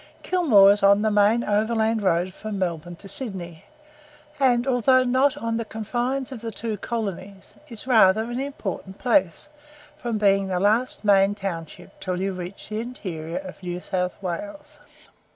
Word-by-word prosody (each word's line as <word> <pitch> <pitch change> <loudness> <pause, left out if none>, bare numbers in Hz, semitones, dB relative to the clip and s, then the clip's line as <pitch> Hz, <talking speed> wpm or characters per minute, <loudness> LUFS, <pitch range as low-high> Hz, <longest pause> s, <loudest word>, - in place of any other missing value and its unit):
Kilmore 235 - +5
is 205 - +1
on 200 +1 +5
the 215 - +2
main 210 +3 +3
overland 220 +1 +1
road 185 -1 +1
from 215 0 -6
Melbourne 175 -2 -3
to 195 - -13
Sydney, 190 -7 -4 0.7
and, 245 -3 +3
although 255 0 +3
not 260 +2 +2
on 230 0 -2
the 230 - -2
confines 240 +5 -3
of 245 -4 -7
the 230 - -4
two 220 0 -4
colonies, 200 -3 -5 0.2
is 230 -1 -4
rather 220 -4 +5
an 240 +2 -4
important 200 -8 -5
place, 195 -8 +1 0.5
from 240 -7 -3
being 195 -2 +3
the 185 -1 -1
last 215 +4 +1
main 200 0 +4
township 170 -6 -6
until 180 -1 -3
you 195 +1 -1
reach 180 +3 -8
the 215 0 -3
interior 175 -9 -6
of 280 -6 -8
New 180 -1 -4
South 180 -1 -2
Wales. 295 - -6
210 Hz, 160 wpm, -24 LUFS, 190-240 Hz, 0.7 s, Kilmore